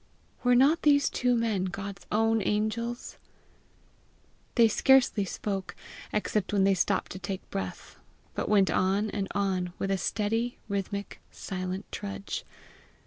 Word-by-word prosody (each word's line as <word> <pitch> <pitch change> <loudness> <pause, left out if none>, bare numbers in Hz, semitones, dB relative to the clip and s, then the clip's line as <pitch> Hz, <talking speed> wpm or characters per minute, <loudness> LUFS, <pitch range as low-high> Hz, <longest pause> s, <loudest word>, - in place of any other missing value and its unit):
Were 245 0 +5
not 280 +7 +5
these 285 -1 +4
two 250 -1 +2
men 220 -5 0
God's 195 +2 -6
own 225 +1 +3
angels! 220 +4 -2 1.4
They 235 -2 +7
scarcely 245 -3 +4
spoke, 195 0 -4 0.4
except 210 -1 -1
when 200 -2 +4
they 195 0 +5
stopped 190 +1 0
to 185 - -6
take 190 0 -5
breath, 95 -1 -5 0.3
but - - -2
went 200 -2 +4
on 200 +3 +1
and 195 -2 -2
on 185 -3 0
with 195 - -2
a 195 - +1
steady, 225 +5 -1
rhythmic, 200 0 -4
silent 185 0 -5
trudge. 200 -1 -5
205 Hz, 135 wpm, -28 LUFS, 195-225 Hz, 1.4 s, They